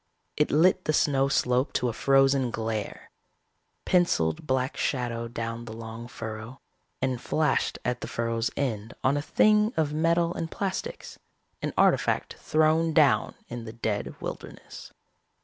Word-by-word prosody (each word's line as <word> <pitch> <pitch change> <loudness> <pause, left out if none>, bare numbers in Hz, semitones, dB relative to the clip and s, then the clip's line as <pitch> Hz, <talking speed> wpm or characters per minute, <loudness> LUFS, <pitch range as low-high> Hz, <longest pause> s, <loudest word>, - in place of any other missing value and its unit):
It 150 - +2
lit 180 +5 +3
the 155 - +1
snow 135 -3 +3
slope 125 -1 +1
to 125 - +1
a 120 - -1
frozen 135 -1 +3
glare, 110 -2 -4 0.7
penciled 150 - +1
black 130 0 0
shadow 120 -3 -2
down 115 0 -5
the 110 - -8
long 115 +1 -8
furrow, 115 +2 -7 0.4
and 130 -2 -1
flashed 155 -1 0
at 125 0 -1
the - - -4
furrow's 115 0 -1
end 115 -6 -2
on 135 +2 +3
a 145 - 0
thing 210 +7 +3
of 150 -2 +1
metal 170 +2 +2
and 165 - -4
plastics, 195 +1 -4 0.4
an - - -2
artifact - - +2
thrown 160 +1 +2
down 140 -9 +3
in 120 -1 -7
the 110 - -8
dead 110 -3 -3
wilderness. - - -8
130 Hz, 145 wpm, -27 LUFS, 115-155 Hz, 0.7 s, lit